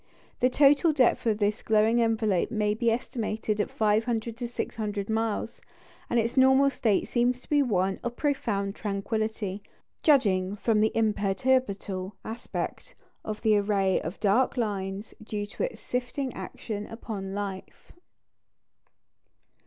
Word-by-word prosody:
The 250 - +4
total 285 +4 +5
depth 255 -4 +2
of 215 -2 +2
this 210 0 0
glowing 220 +2 +3
envelope 220 -5 +1
may 210 -2 +1
be 230 +2 +1
estimated 220 -3 -1
at - - -2
500 220 +1 0
to 240 -1 -3
600 210 -4 -4
miles, 225 0 -2 0.5
and 240 - +2
its 230 +1 -1
normal 265 +1 +5
state 220 -6 +1
seems 245 +1 +1
to - - -20
be 295 -1 +5
one 195 -7 +1
of 240 0 -3
profound 210 -10 -1
tranquillity, 210 -1 -3 0.4
judging 200 - +3
from 215 +1 +1
the 220 - +3
imperturbable 205 -3 0
aspect 240 - -5 0.3
of 215 0 -5
the 215 -2 +4
array 200 -2 +2
of 165 +5 -6
dark 230 +6 +2
lines 200 -2 -3
due 210 -1 -3
to 485 - -3
its - - -14
sifting 250 +2 -3
action 210 -2 -6
upon 200 -4 -6
light. 200 -2 -4
220 Hz, 135 wpm, -27 LUFS, 205-240 Hz, 0.5 s, total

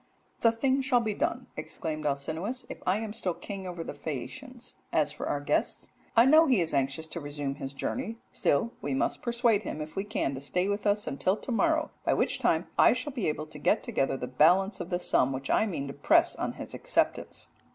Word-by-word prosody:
"'The 230 - +5
thing 265 +3 +1
shall 260 -2 +3
be 220 -3 -1
done,' 325 +9 -1
exclaimed 155 -1 -4
Alcinous, 160 - -2
'if - - -8
I 185 +2 +3
am 220 -1 -4
still 190 -6 -2
king 195 -2 -7
over 175 -2 -5
the - - -6
Phaeacians. 245 - -7
As - - +2
for - - -5
our - - 0
guest, - - -1 0.2
I 230 +1 +7
know 315 +4 +7
he 255 -7 +4
is 165 -3 0
anxious 135 +3 0
to 170 - -6
resume 145 -2 -4
his 135 -1 -6
journey, 225 - -3
still 145 +11 +1
we 140 -1 -2
must - - 0
persuade 235 -3 +2
him 170 - -5
if 155 0 -6
we 195 - -1
can 205 -9 -1
to 130 - -6
stay 180 +6 0
with 205 +1 -1
us 205 +1 +2
until 185 +8 0
to 255 - -6
morrow, 315 +5 +2
by - - +2
which - - 0
time - - +2
I - - +7
shall 295 - -4
be 240 -7 -1
able 150 0 -3
to 150 -1 -10
get 145 - +2
together 135 0 0
the 125 - -4
balance 175 - +3
of 175 - -5
the 175 - +1
sum 135 -6 +3
which 135 +1 -3
I 220 - +3
mean 160 -8 -3
to 140 - -6
press 335 - +3
on - - -3
his - - -8
acceptance.'" - - -1
190 Hz, 225 wpm, -29 LUFS, 145-235 Hz, 0.2 s, I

